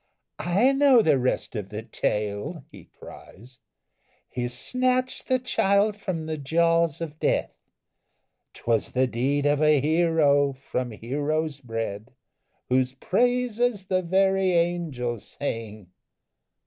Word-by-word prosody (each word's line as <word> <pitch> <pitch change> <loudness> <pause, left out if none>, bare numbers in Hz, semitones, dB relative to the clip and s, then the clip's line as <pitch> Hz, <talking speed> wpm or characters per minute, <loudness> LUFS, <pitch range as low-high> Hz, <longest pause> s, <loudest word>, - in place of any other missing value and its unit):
"I 195 - +3
know 270 -4 +5
the 150 -7 +3
rest 125 0 -1
of 105 -3 -4
the 105 +1 -6
tale," 105 - -3
he - - -13
cries; 120 +5 -15 0.7
"He 120 -1 -3
snatched 255 - -1
the 255 - +3
child 205 -4 +1
from 185 -6 -4
the 155 -1 -4
jaws 165 +2 +1
of 155 -2 -6
death! - - 0 1.0
'Twas 115 -2 -1
the 130 +1 +3
deed 135 +4 -1
of 145 0 +2
a 150 -1 +5
hero, 150 -2 +3
from 130 -2 -4
heroes 145 +6 -2
bred, 115 -3 -5 0.6
Whose 130 0 +1
praises 245 - 0
the 185 -1 0
very 190 +1 +2
angels 165 -10 -1
sing!" 110 -8 -5
150 Hz, 120 wpm, -25 LUFS, 125-190 Hz, 1.0 s, know